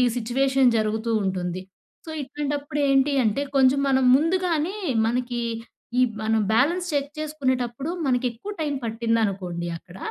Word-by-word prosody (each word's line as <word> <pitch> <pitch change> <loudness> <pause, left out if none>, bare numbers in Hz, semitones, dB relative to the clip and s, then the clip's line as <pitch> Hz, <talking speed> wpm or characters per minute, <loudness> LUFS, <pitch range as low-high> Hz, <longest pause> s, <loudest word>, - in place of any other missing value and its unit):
Situation 255 +1 +2
జరుగుతూ 220 +1 -1
ఉంటుంది. 185 -1 -2 0.4
So, - - -9
ఇట్లాంటప్పుడు 285 +1 -3
ఏంటి 275 +1 +3
అంటే 220 +6 +1
కొంచెం 270 0 +5
మనం 265 -1 +3
ముందుగానే, 335 +2 +1 0.3
మనకి 240 +1 -1 0.6
ఈ - - +5 0.2
మనం 220 0 +2
బ్యాలెన్స్ 340 +10 +2
చెక్ 285 0 -1
చేసుకునేటప్పుడు 265 -3 -2 0.2
మనకెక్కువ 250 - -1
టైం 300 -2 -1
పట్టిందనుకోండి 215 -7 -1
అక్కడ, 180 +2 -15
255 Hz, 120 wpm, -24 LUFS, 225-285 Hz, 0.6 s, కొంచెం